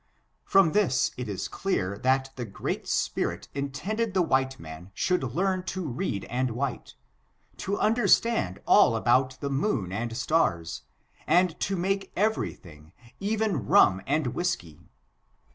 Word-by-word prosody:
From 195 -5 +4
this 175 -11 +2
it 125 -3 -5
is 100 - -3
clear 100 - -2
that 130 +2 +1
the 125 - -4
Great 105 -4 -4
Spirit - - -1
intended 180 - -3
the 185 - +4
white 130 -4 0
man 80 +3 -10
should 180 -1 +1
learn 185 +9 0
to 185 -3 -3
read 120 - -3
and 125 -1 -2
write; 135 -2 -4 0.6
to 200 +1 -2
understand 215 - +2
all 115 - +5
about 130 +3 +2
the 140 - -2
moon 135 - 0
and 115 +3 -3
stars, 95 - 0 0.5
and 175 +1 +3
to 195 - -1
make 195 +2 -1
every 215 +3 0
thing, 75 -2 -16 0.3
even 205 - -1
rum 95 -1 +5
and 145 -3 0
whisky. 130 - -3
135 Hz, 140 wpm, -27 LUFS, 115-190 Hz, 0.6 s, all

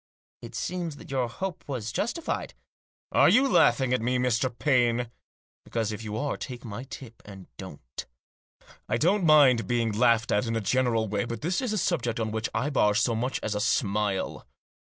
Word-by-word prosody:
" - - -77
It - - -10
seems 175 -4 -3
that 140 - -12
your 130 -3 0
hope 175 +9 -5
was 120 -6 -4
justified." 315 - -3 0.3
" - - -77
Are - - +5
you 275 +4 +5
laughing 125 - +3
at 125 - +1
me, 125 +2 +1
Mr. 125 0 +1
Paine? 120 -1 +1 0.5
Because, 115 -2 -2
if 110 +1 -6
you 105 -1 -4
are, 145 +5 -2
take 125 -3 -7
my 115 +3 -6
tip 125 -3 -11
and 95 -3 -11
don't 70 -9 -9 0.8
I - - +1
don't 190 +5 +2
mind 145 -7 +5
being 120 -2 +1
laughed 115 +1 +2
at 105 +3 +1
in 115 - -1
a - - +1
general 115 0 +1
way; 100 +2 -1
but 115 -2 -5
this 175 - 0
is 250 -4 -2
a 215 - 0
subject 150 - -1
on 110 -1 -1
which 110 +1 -2
I 130 +7 -1
bar 105 -6 +3
so 115 +2 +2
much 125 +4 -2
as 110 - -1
a 105 - -2
smile. 105 -2 -1
120 Hz, 200 wpm, -27 LUFS, 110-135 Hz, 0.8 s, Are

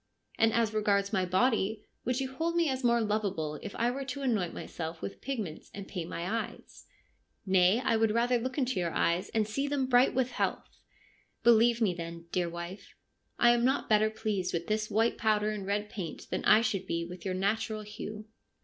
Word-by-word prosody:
1 225 - +6
And - - -4
as 220 -2 +1
regards 200 -1 +1
my 190 -2 +2
body, 215 +2 +1 0.2
would 250 +1 0
you 265 -1 -3
hold 330 +4 -1
me 340 -1 +3
as 260 -1 -2
more 235 -1 +3
lovable 195 -9 -1
if 205 - -7
I 235 +1 +1
were 275 +2 -4
to 275 +1 -5
anoint 210 -9 +1
myself 160 0 -6
with 195 - -7
pigments 220 - -5
and 200 -1 -7
paint 175 -4 -5
my 170 - -4
eyes? 225 +3 -5 0.2
' - - -42
' - - -45
Nay, 185 +5 +5
I 230 -3 +2
would 225 0 +3
rather 240 +3 +2
look 255 +3 -4
into 255 -7 0
your 175 -1 0
eyes 170 +3 0
and 220 -2 0
see 275 +6 -1
them 280 -2 0
bright 250 0 +4
with 255 -1 +1
health.' - - -3 0.3
' - - -38
Believe 235 0 +5
me, 200 -5 +3
then, 170 -1 -7
dear 175 -2 0
wife, 170 +3 -8 0.4
I 240 - +6
am 240 0 +2
not 265 +3 +1
better 215 0 +4
pleased 215 -4 -2
with 170 0 -2
this 215 +1 -1
white 225 +2 +1
powder 215 -1 +2
and 205 -2 -5
red 205 +1 -1
paint 185 -6 -7
than - - -2
I 215 - +7
should 195 -5 -1
be 170 0 -1
with 175 0 -9
your 185 -2 -2
natural 215 +3 -1
hue.' 210 0 -7
215 Hz, 215 wpm, -30 LUFS, 185-240 Hz, 0.4 s, I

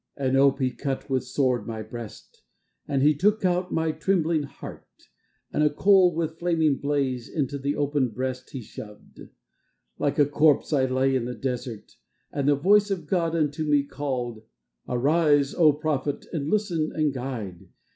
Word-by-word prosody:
And 135 -2 0
ope 135 0 +4
he 130 -2 0
cut 135 +1 -4
with 130 -1 0
sword 125 -3 0
my 110 -1 -5
breast, 110 0 -10 0.5
And 135 -1 0
out - - +4
he 150 - +6
took 205 +8 +1 0.3
my 160 -1 0
trembling 160 0 +1
heart, 140 -1 -10 0.7
And - - +1
a 150 - +4
coal 185 +2 +4
with 160 -1 -3
flaming 160 -5 +2
blaze 135 -4 -1
Into 140 -2 -2
the 140 +2 -1
opened 140 -5 0
breast 130 0 -4
he 130 -4 -7
shoved. 105 0 -12 0.8
Like 145 - 0
a 145 - +5
corpse 150 +1 +2
I 135 -3 +3
lay 130 +1 +1
in 125 -2 0
the 125 0 -5
desert. 125 -4 -5 0.3
And 140 -1 0
the 145 - +5
voice 205 +8 +4
of 185 -5 -3
God 165 0 0
unto 155 -1 0
me 145 -2 +2
called: 130 -6 -4 0.5
Arise, 145 +2 +2
O 160 -4 +5
prophet, 145 -1 -2
and 150 -3 -2
listen, 175 -7 0
and 155 -3 +1
guide. 120 -9 -6
145 Hz, 165 wpm, -25 LUFS, 130-155 Hz, 0.8 s, he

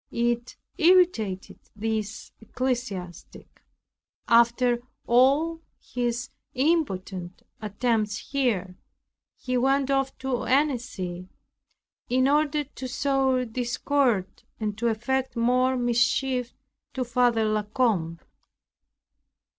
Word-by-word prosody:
It 235 0 -1 0.2
irritated 330 - +3 0.2
this 220 0 -3
ecclesiastic. 225 -8 -5 0.7
After 235 +1 +4 0.3
all 280 +7 +3 0.2
his 240 0 -3 0.2
impotent 195 - -1 0.2
attempts 215 0 -1
here, 205 -10 -1 0.6
he 255 -1 -2
went 270 +2 +2
off 270 -1 0
to 260 -2 -2
Annecy, 235 -10 -1 0.8
in 255 +2 +3
order 300 +1 +2
to 265 -2 -8
sow 265 -1 +1
discord, 240 -2 0 0.2
and 210 -2 -2
to 235 - +1
effect 260 +4 -1
more 250 +2 +2
mischief 245 +1 +1 0.4
to 260 - 0
Father 240 -2 +2
La 215 0 +1
Combe. 210 -7 0
245 Hz, 90 wpm, -26 LUFS, 220-265 Hz, 0.8 s, After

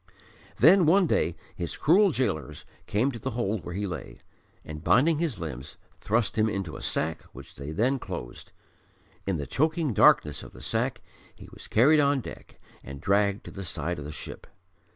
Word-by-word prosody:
Then 170 +5 +6
one 190 +3 +5
day 85 - +1 0.2
his 85 - -5
cruel 190 +6 +4
gaolers 80 - -2 0.2
came 120 +7 +1
to 120 - -8
the - - -3
hold 110 -3 -1
where 85 - -6
he 100 +1 -2
lay, 90 -5 -6 0.5
and, 75 0 -8
binding 130 - +4
his 160 - -1
limbs, 70 -6 -7 0.2
thrust 110 +1 0
him 110 +1 +3
into 95 -6 -4
a - - -8
sack, 80 +1 -2
which 65 0 -12
they 70 +3 -7
then 125 +11 +1
closed. - - -8 0.8
In 95 -3 0
the 70 - -4
choking 155 - 0
darkness 75 -6 +4
of - - -12
the - - -12
sack - - -1 0.3
he - - -13
was - - -10
carried 145 +7 +5
on 140 -1 +3
deck 120 - -10 0.2
and 70 0 -8
dragged 100 - +1
to - - -8
the 95 - -7
side 85 -1 -3
of 70 - -7
the 75 - -6
ship. - - -9
105 Hz, 185 wpm, -27 LUFS, -, 0.8 s, Then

